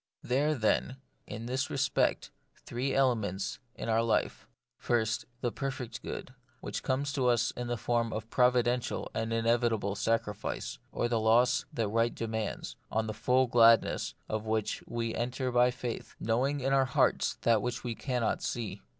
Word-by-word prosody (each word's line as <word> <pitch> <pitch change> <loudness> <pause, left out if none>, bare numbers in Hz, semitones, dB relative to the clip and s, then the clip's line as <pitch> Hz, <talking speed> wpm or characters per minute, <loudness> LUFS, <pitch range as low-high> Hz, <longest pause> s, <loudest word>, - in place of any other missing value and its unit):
There 135 +4 +1
are 155 - +1
then, 125 +2 +1 0.3
in 115 +2 -6
this 130 +3 -1
respect, 140 +1 +1 0.3
three 125 +3 -2
ele 135 -2 +5
ments 100 -4 -3 0.2
in - - -6
our 115 0 +3
life: 115 -1 0 0.2
— - - -58
First, 110 -1 +1 0.2
the 120 - 0
perfect 130 0 -4
good, 125 - -6 0.3
which - - -4
comes 140 +2 -1
to 130 -3 +1
us 120 -2 +3
in 120 0 -5
the 120 0 -1
form 115 +1 0
of 110 +1 -5
providential 125 -1 +2
and 115 0 -2
inevitable 115 -3 +1
sacrifice, 105 - -2
or 120 - 0
loss 115 +1 +3
that 115 -3 -1
right 115 +2 +1
demands, 110 -2 -4
on 110 0 +1
the 110 - -3
full 125 +4 +3
gladness 115 -2 +4
of 110 0 -3
which 110 -1 -1
we 115 -1 -2
enter 125 +2 -2
by 125 0 +5
faith, 125 -2 -5
knowing 130 +6 0
in 135 +1 +1
our 135 -1 +4
hearts 130 - +2
that 115 -2 +3
which 125 +3 -3
we 120 -2 -2
cannot 125 -2 -1
see. 115 -4 -3
120 Hz, 165 wpm, -30 LUFS, 110-125 Hz, 0.3 s, ele